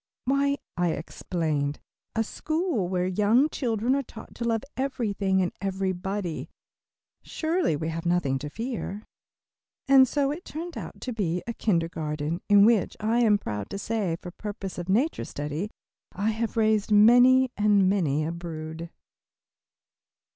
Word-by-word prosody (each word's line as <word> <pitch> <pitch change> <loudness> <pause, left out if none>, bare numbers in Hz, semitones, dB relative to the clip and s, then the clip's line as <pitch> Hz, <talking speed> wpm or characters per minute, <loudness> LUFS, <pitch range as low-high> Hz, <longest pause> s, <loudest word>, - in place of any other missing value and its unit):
"Why," 280 +1 +2 0.2
I 175 -2 +2
explained, 150 -2 -2 0.4
"a 225 - +2
school 310 - -1
where 180 -1 0
young 210 +10 +3
children 235 -2 0
are 280 - +1
taught 225 -4 -12
to 240 - -6
love 225 -2 0
everything 205 -8 0
and 175 - -1
everybody. 190 -2 -2 0.7
Surely 325 - 0
we 160 +2 -3
have 165 0 -4
nothing 160 -7 +1
to 150 +2 -5
fear." 225 - -5 0.8
And 270 -1 +7
so 280 +1 +1
it 330 +5 -6
turned 335 +3 -6
out - - -8
to 250 - -4
be, 180 -5 -1
a 235 - -3
kindergarten, 165 -5 -1
in 205 0 +7
which, 225 -4 +2
I 225 +3 +1
am 220 -4 +5
proud 105 - -5
to - - -4
say, 200 -4 -1
for 175 +1 -9
purposes 200 -1 -6
of 175 +1 -6
nature 250 +12 +1
study, 150 +7 -4 0.4
I 205 +3 0
have 225 +1 -3
raised 215 -1 +2
many 245 +4 +6
and 205 -2 +4
many 155 -7 +1
a 160 - -2
brood. 165 -1 -6
205 Hz, 145 wpm, -26 LUFS, 170-235 Hz, 0.8 s, And